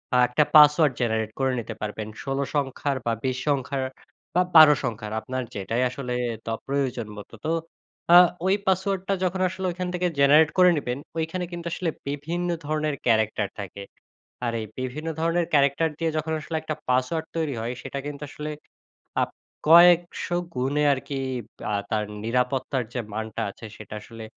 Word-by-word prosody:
আ - - +5
১ 125 - -18
টা 150 - +7
password 150 -1 +7
generate 110 -2 0
করে 135 -1 +2
নিতে 115 -1 -5
পারবেন। 105 0 -4 0.2
১৬ 135 0 -2 0.2
সংখ্যার, 140 0 -1
বা 115 - +1
২০ 130 -1 0
সংখ্যার, 135 -1 0 0.5
বা 180 - +5
১২ 155 -2 +10
সংখ্যার, 110 -3 -4
আপনার 130 -1 -3
যেটাই 115 +5 -1
আসলে 125 -1 -5 0.3
ত - - -21 0.2
প্রয়োজন 130 -5 -1
মত। 105 - -9 0.2
তো, 160 - +1 0.6
আ - - +11 0.3
ঐ - - +2 0.2
পাসওয়ার্ডটা 190 +1 +1
যখন 185 +1 0
আসলে 190 +1 -5
ওইখান 180 +1 -4
থেকে 180 0 0
জেনারেট 150 +3 +6
করে 180 0 +7
নেবেন, 125 -3 -2 0.2
ঐখানে 165 +3 -2
কিন্তু 170 -1 -6
আসলে 180 -3 -1 0.2
বিভিন্ন 165 +5 -2 0.2
ধরনের 155 -1 -1
ক্যারেক্টার 110 -3 +2
থাকে। 100 0 -7 0.6
আর 120 - 0
এই - - -4
বিভিন্ন 135 +5 -4
ধরনের 165 +1 +1
ক্যারেক্টার 140 +3 +3
দিয়ে 165 -1 0
যখন 160 +1 -2
আসলে 160 +1 -6
১ 155 - -15
টা 155 - 0
পাসওয়ার্ড 130 +6 +1
তৈরি 155 -4 -1
হয়, 120 +2 -3
সেটা 140 +1 -5
কিন্তু 145 0 -6
আসলে 150 +1 -6 0.7
আপ - - 0 0.4
কয়েকশো 175 +1 +6 0.2
গুণে 135 +4 0
আর 135 - 0
কি 140 - -4 0.6
আ - - 0 0.2
তার 110 -2 +1 0.2
নিরাপত্তার 125 +2 0
যে 125 - -2
মানটা 110 0 -3
আছে, 105 - -13
সেটা 110 0 -10
আসলে 115 +1 -11
140 Hz, 170 wpm, -25 LUFS, 125-160 Hz, 0.7 s, আ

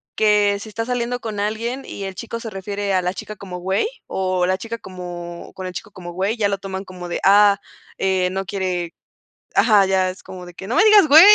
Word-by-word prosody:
que 210 -1 +4
si 215 - -8
estás 225 +2 -4
saliendo 245 0 -1
con 215 -3 -5
alguien 230 +5 -2
y 200 - -7
el 190 -1 -5
chico 230 +3 -5
se 230 - -6
refiere 200 +1 -3
a 185 - +3
la 180 +1 -1
chica 215 +2 -7
como 185 -2 -7
güey 190 - +1 0.2
o 185 -1 0
la 185 +1 +1
chica 230 +2 -5
como 175 -3 -8
con 185 -1 -6
el 180 - -6
chico 215 - -7
como 175 -3 -9
güey, 195 +6 -1
ya 210 - +2
lo 200 -1 -1
toman 195 0 -5
como 180 -1 -8
de, - - -2
ah, 200 0 +6 0.4
eh, 190 -1 +1
no 195 0 -2
quiere 180 -3 -2 0.6
ajá, 205 -4 +5
ya 190 -1 +2
es 185 - -11
como 180 -1 -9
de 175 - -12
que: 190 - -9
"No 245 - 0
me 425 - +6
digas, 415 -7 +7
güey, 320 +7 +10
195 Hz, 235 wpm, -21 LUFS, 185-215 Hz, 0.6 s, güey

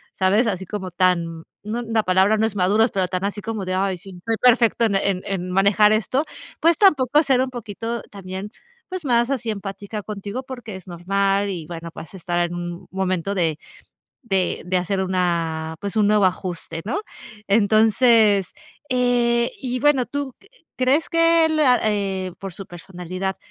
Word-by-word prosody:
¿sabes? 200 +5 +3
así 190 -4 -2
como 190 -2 -5
tan 170 -2 0 0.2
no, 220 +3 -3
la 225 -2 0
palabra 190 +3 +3
no 220 - +2
es 220 -2 -3
maduros, 205 +5 +3
pero 190 -2 0
tan 185 +1 -2
así 205 +1 -3
como 220 -2 -4
de: 185 - -2
"Ay, 190 0 0
sí, 195 +2 -12
estoy 225 +5 -2
perfecto 235 -2 +4
en 195 -3 0
en 185 -2 -3
manejar 200 +3 +4
esto". 220 +6 +1 0.4
Pues, 335 0 +4
tampoco 300 - +4
ser 265 -3 +3
un 260 - -1
poquito 230 -1 -5
también, 195 +1 -7 0.4
pues, 370 -2 -5
más 240 0 +2
así 245 -4 -2
empática 205 0 -5
contigo, 210 +4 -5
porque 245 -6 -8
es 190 - -10
normal. 195 +3 0
Y 175 -5 -5
bueno, 170 0 -7
pues 165 - -10
estar 175 -2 -2
en 175 - -6
un 175 0 -6
momento 190 0 -1
de 165 -5 0 0.7
de 195 -6 -1
de 185 +1 0
hacer 185 +2 0
una 170 -4 -1
pues, 200 +1 -4
un 210 -1 +4
nuevo 210 -2 +4
ajuste, 175 -3 -4
¿no? 280 - -2 0.5
Entonces, 215 0 +4 0.4
eh, 240 -2 +2
y 250 -1 -3
bueno, 275 -3 +3
¿tú 280 -1 -4
q - - -23 0.3
crees 265 +5 +2
que 330 0 +4
él 315 -1 +1
a 255 -4 +5
eh, 195 -3 -1
por 195 -1 -7
su 195 - -8
personalidad 185 +2 -5
200 Hz, 175 wpm, -22 LUFS, 185-235 Hz, 0.7 s, a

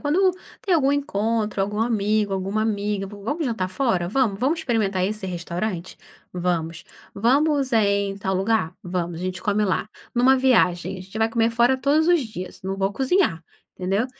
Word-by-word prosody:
Quando 365 +6 +3 0.3
tem 390 - 0
algum 275 -4 +3
encontro, 220 -6 -1
algum 205 +2 -1
amigo, 215 -2 +1
alguma 195 +3 -1
amiga, 205 -2 -1
vamos 215 - -4
jantar 220 -8 -1
fora? 185 -6 0
Vamos, 215 -3 +1
vamos 310 +6 +1
experimentar 205 -8 0
esse 210 -1 -3
restaurante? 180 +1 -4 0.3
Vamos. 175 -1 -2 0.3
Vamos, 275 +5 +2
é, 220 -2 +4
em 200 0 0
tal 190 -1 -2
lugar? 190 -3 0
Vamos, 175 -2 -3
a - - -5
gente 185 0 -4
come 210 -1 +1
lá. 190 +1 -1 0.3
Numa 255 +2 +5
viagem, 185 -8 +2
a - - -9
gente 195 +4 -8
vai 220 0 +3
comer 225 0 +1
fora 240 +3 +3
todos 295 +5 +2
os 350 -3 +5
dias, 185 -7 -8
não 190 +1 -3
vou 195 0 +1
cozinhar, 265 - +1 0.3
entendeu? 195 +6 0
210 Hz, 175 wpm, -23 LUFS, 190-250 Hz, 0.3 s, Numa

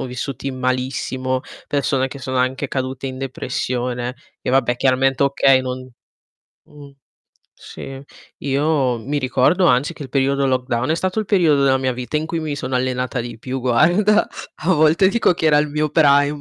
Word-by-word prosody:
sono - - -3
vissuti 130 +2 -5
malissimo, 130 0 -2 0.3
persone 135 -2 0
che 135 +1 -9
sono 130 0 -4
anche 130 +2 0
cadute 130 0 -3
in 130 0 -7
depressione 125 -1 -3 0.3
e - - -6
vabbè 125 -2 +2
chiaramente, 135 +1 +2
okay, 135 -1 +4
non 130 0 -6 0.8
mh. 145 -1 -14 0.7
Sì, 135 0 -9 0.4
io 140 -3 +1
mi 145 +6 -3
ricordo 145 +7 +2
anzi 130 +5 +2
che 150 - -9
il - - -9
periodo 140 +1 +1
lockdown 130 +1 -1
è - - +3
stato 185 +4 -2
il 215 - 0
periodo 165 -8 +3
della 130 -1 +4
mia 130 -1 -1
vita 125 +4 -4
in 155 - -1
cui 165 0 -3
mi 155 -2 -3
sono 130 -2 -3
allenata 125 0 -2
di 120 -1 -6
più 130 +3 -5
guarda, 175 - +3 0.3
a 185 +3 +2
volte 160 +5 +4
dico 210 -3 +2
che 160 - -1
era 150 -1 +5
il 150 - +2
mio 150 +1 -1
prime 145 -1 +3
135 Hz, 175 wpm, -20 LUFS, 130-150 Hz, 0.8 s, era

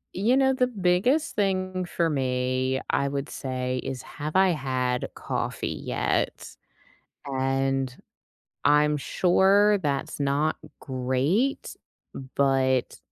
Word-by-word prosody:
You 230 +8 +2
know, 265 -1 +4
the 255 -1 +2
biggest 225 - +1
thing 185 -2 0
for 170 -1 0
me, 130 -2 0
I 140 - +1
would 140 +1 -3
say, 130 -1 -3
is 130 -3 -5
have 150 +4 -6
I 190 0 +5
had 130 -5 -1
coffee - - -3 0.2
yet? - - -2 0.7
And 135 -1 -1 0.7
I'm 150 0 +4
sure 195 +7 +3
that's 145 -2 -2
not 145 +3 +1 0.2
great, 135 - -1 0.6
but 130 -2 +1
145 Hz, 105 wpm, -26 LUFS, 130-190 Hz, 0.7 s, I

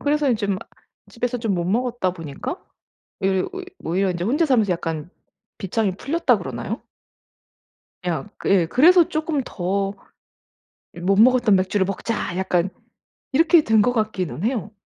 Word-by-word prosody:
그래서 290 -1 +1
이 240 - +3
좀 200 -3 -1 0.5
집에서 245 +2 -2
좀 225 -4 -1
못 170 -1 -1
먹었다 230 -1 0
보니까 165 - -6 0.6
외려 190 -1 +1
오히 380 0 -7 0.2
오히려 185 +4 0
인제 175 0 -3
혼자 285 - +2
살면서 225 -9 +2
약간 165 -2 -3 0.5
빗장이 195 0 -1
풀렸다 330 +9 +1
그러나요? - - -5 1.2
그냥 175 +3 -3 0.2
예 185 -4 +4
그래서 330 - +5
쪼끔 310 -3 -1
더 195 -1 -2 1.0
'이 - - -9
못 195 +3 +2
먹었던 240 -4 +5
맥주를 190 +1 +1
먹자.' 200 -1 -3
약간 185 -1 0 0.6
이렇게 325 +3 +5
된 220 -4 +4
것 245 +4 +2
같기는 205 -6 -2
해요. 225 -4 -1
205 Hz, 295 characters per minute, -22 LUFS, 185-255 Hz, 1.2 s, 그래서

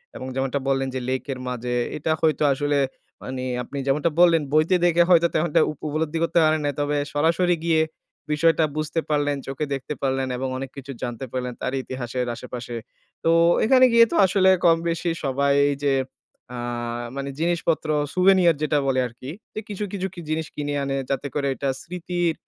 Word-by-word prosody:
এবং 130 - -6
যেমনটা 135 +1 -1
বললেন 135 -1 +1
যে, - - -1
লেকের 130 0 -3
মাঝে, 125 0 -3 0.2
এটা 150 +2 -1
হয়তো 155 -1 +2
আসলে 145 +1 0 0.5
মানে 130 0 -5 0.2
আপনি 140 - -8
যেমনটা 150 +4 +2
বললেন, 170 -2 +6
বইতে 155 +4 +4
দেখে 175 0 +5
হয়তো 170 -1 +6
তেমনটা 155 0 +2
উপ 155 - -11
উপলব্ধি 155 +2 -2
করতে 170 - +2
পারেন 155 0 +3
নাই। 145 - 0
তবে 145 0 0 0.2
সরাসরি 170 +4 +2
গিয়ে 160 -1 +3 0.5
বিষয়টা 165 +1 +3
বুঝতে 155 +2 -1
পারলেন, 145 -1 +1
চোখে 135 +3 -3
দেখতে 135 +2 -4
পারলেন 135 -1 0
এবং 130 - -2
অনেক 135 0 -5
কিছু 140 0 -7
জানতে 120 +1 -4
পারলেন, 125 -1 -3
তার 130 - -2
ইতিহাসের 125 -1 -4
আশেপাশে। 125 0 -7 0.5
তো 165 - +2 0.4
এখানে 255 +2 +6
গিয়ে 230 0 +8
তো - - -1
আসলে 190 0 +3 0.2
কম-বেশি 165 0 +2
সবাই 140 +1 +2 0.3
যে, 140 -1 +3 0.6
আ - - -5 0.6
মানে 140 0 -4
জিনিসপত্র, 165 -1 0 0.3
স্যুভেনিয়ার 185 -2 +5
যেটা 150 -1 +2
বলে 130 -1 +2
আরকি। 130 +4 -9 0.2
যে - - -4
কিছু, 205 0 -4
কিছু 190 -1 -2
কি 185 - -9
জিনিস 160 0 -1
কিনে 145 -1 -3
আনে, 135 0 -1
যাতে 135 +1 -1
করে 140 -1 0
এটা 140 - -2
স্মৃতির 175 -1 -2
150 Hz, 175 wpm, -23 LUFS, 135-170 Hz, 0.6 s, গিয়ে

